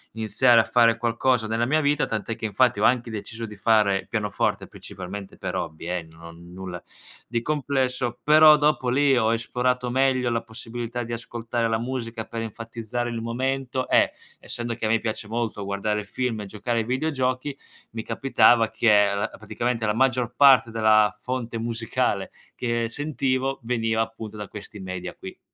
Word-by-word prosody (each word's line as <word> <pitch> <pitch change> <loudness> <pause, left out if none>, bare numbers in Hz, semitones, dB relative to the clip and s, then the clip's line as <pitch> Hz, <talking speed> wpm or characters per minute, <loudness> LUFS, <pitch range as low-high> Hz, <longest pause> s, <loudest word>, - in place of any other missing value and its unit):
iniziare 115 +2 +4
a 110 - +3
fare 115 -2 +4
qualcosa 120 0 +1
nella 115 +2 0
mia 155 +5 +2
vita. 145 0 +2
Tant'è 110 +1 -3
che 115 - -18
infatti 115 0 +2
ho - - +1
anche 120 -1 +3
deciso 110 +1 -6
di 105 -1 -9
fare 100 -1 +2
pianoforte, 105 -2 -1
principalmente 95 +1 -9
per - - -4
hobby, 80 +2 -5
eh, 90 -2 -2
no 80 +1 -13
nulla 90 +1 -9 0.5
di 115 0 -1
complesso. 130 -4 -1
Però 155 0 +7
dopo 150 -4 +1
lì 135 +1 +3
ho 110 -1 +3
esplorato 125 +2 -1
meglio 130 -1 +2
la 115 -1 0
possibilità 120 +1 -6
di 115 +1 -6
ascoltare 115 0 -3
la 110 - +1
musica 115 -2 -4
per 115 -1 -5
enfatizzare 115 +2 -4
il 115 -1 -4
momento 130 +2 -2
e - - +4 0.3
essendo 120 -1 -4
che 115 - -4
a - - +1
me 115 0 +3
piace 110 -2 -4
molto 115 -3 -2
guardare 105 +1 -2
film 115 +1 -3
e - - -6
giocare 115 +4 -2
ai 110 - -1
videogiochi, 130 0 -1 0.3
mi 110 0 -5
capitava 120 -4 +3
che 115 -2 +2
allo 100 -1 +3
praticamente 115 +1 -2
la 105 - +1
maggior 125 -1 +1
parte 135 -5 +6
della 110 -1 +4
fonte 125 -2 -3
musicale 115 -2 -1 0.2
che 115 -1 -1
sentivo 135 -1 -1
veniva 115 -2 0
appunto 110 -1 -5
da 105 -2 -6
questi 105 0 -9
media 95 -1 -6
qui. - - -10
115 Hz, 170 wpm, -24 LUFS, 110-125 Hz, 0.5 s, Però